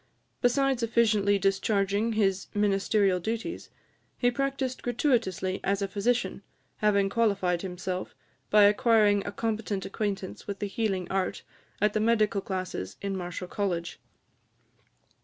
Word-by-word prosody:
Besides 265 +1 +2
efficiently 215 -3 +3
discharging 200 +2 +1
his 195 -3 +1
ministerial 200 -1 +2
duties, 230 - -4 0.5
he 245 -1 +2
practised 270 0 -2
gratuitously 230 - 0
as 200 0 0
a - - 0
physician, 200 0 -1 0.4
having 200 -2 +3
qualified 195 -5 +1
himself, 185 0 -5 0.3
by 210 0 +6
acquiring 210 -1 +4
a - - -2
competent 215 -2 -2
acquaintance 200 -2 -4
with 200 - -4
the 205 - -3
healing 195 -2 -1
art 190 -1 -1 0.4
at 210 0 +2
the 215 - +1
medical 215 -2 +2
classes 185 - -4
in 200 -1 -2
Marischal 180 0 -5
College. 175 -4 -3
205 Hz, 120 wpm, -28 LUFS, 195-225 Hz, 0.5 s, by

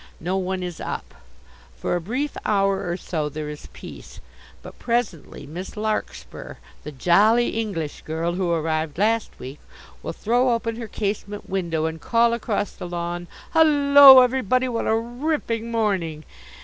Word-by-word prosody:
No 180 +4 -2
one 190 -1 -2
is 175 -2 -6
up. - - -5 0.6
For 60 - -1
a 175 - -1
brief 255 - -3
hour 195 -2 +1
or 175 - -2
so 155 -5 -3
there 150 +1 -6
is 150 0 -9
peace. - - -11 0.4
But - - -12
presently 230 - -2
Miss 175 +8 -8
Larkspur 215 0 -4 0.3
the 150 - -7
jolly 205 - +3
English 195 -10 -4
girl 165 +2 -3
who 180 -1 -1
arrived 160 -2 -1
last 220 +3 0
week 130 +3 -9 0.4
will - - -4
throw 245 +2 +1
open 230 -1 -3
her 235 -1 -6
casement 205 0 -4
window 170 -5 -1
and 160 0 -4
call 235 0 +2
across 215 -3 -2
the 175 - -8
lawn, 175 0 -4 0.3
"Hullo 285 -4 +8
everybody! 255 0 +1
What 235 -2 -2
a 220 - +3
ripping 235 -1 -2
morning!" 190 -9 -1
200 Hz, 150 wpm, -23 LUFS, 170-235 Hz, 0.6 s, Hullo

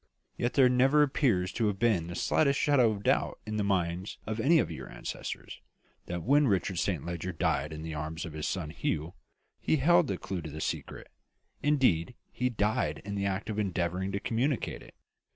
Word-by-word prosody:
Yet 120 +2 -1
there 135 -2 +7
never 135 +4 +4
appears 120 -10 +1
to 110 -2 0
have 100 -2 -1
been 105 -7 +2
the 85 - -6
slightest 140 +6 +2
shadow 135 -6 +4
of 105 -2 -4
doubt - - +1
in 110 0 -3
the 105 - +1
minds 90 -1 -1
of 110 +1 -3
any 155 +9 +5
of - - +1
your - - -7
ancestors, - - -6 0.5
that 85 -1 -4
when 145 +3 +4
Richard 95 -4 0
Saint 90 -8 -1
Leger 85 +1 -3
died 80 - 0
in 80 0 -6
the 80 -1 -5
arms 80 +2 -4
of 85 - -7
his 75 0 -3
son 80 -5 -3
Hugh, 80 +2 -2 0.5
he - - +1
held 170 +3 +4
the 95 - -2
clue 95 -1 -4
to 80 - -7
the 75 +1 -7
secret; - - -4 0.5
indeed, 125 - +2 0.2
he 125 0 0
died 110 +1 -1
in 100 - -4
the 100 0 -1
act 95 0 -2
of 110 -1 -3
endeavouring 95 -1 -1
to 100 - -1
communicate 120 +5 -1
it." - - -15
100 Hz, 200 wpm, -30 LUFS, 85-125 Hz, 0.5 s, there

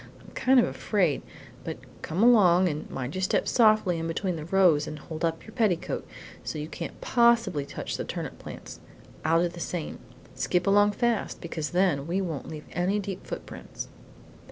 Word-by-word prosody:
I'm - - -16
kind 260 0 +4
of 240 - +5
afraid, 180 -10 0 0.4
but - - -5 0.2
come 175 +7 -1
along 190 -7 +6
and 150 -3 -3
mind 130 +1 -4
you 185 - -3
step 190 - +1
softly 215 -7 +4
in 165 - -2
between 180 +2 -1
the 155 -2 -6
rows 170 -4 +4
and 155 - -5
hold 155 +1 -7
up 165 -1 0
your 220 - -11
petticoat, 210 -8 0 0.4
so - - -4
you 150 0 -4
can't 165 +1 -7
possibly 230 - +3
touch - - -4
the - - -2
turnip - - -5
plants. - - -9 0.4
I'll 165 +2 +3
do 175 - +1
the 170 - -10
same. 170 -1 -4 0.3
Skip 180 0 0
along 205 +1 +5
fast, 235 -1 0
because 160 -3 -4
then 175 -6 +1
we 180 +3 0
won't 165 -7 -4
leave 155 -1 -7
any 180 +4 +1
deep 195 -2 -5
footprints." - - -7
180 Hz, 180 wpm, -27 LUFS, 160-205 Hz, 0.4 s, along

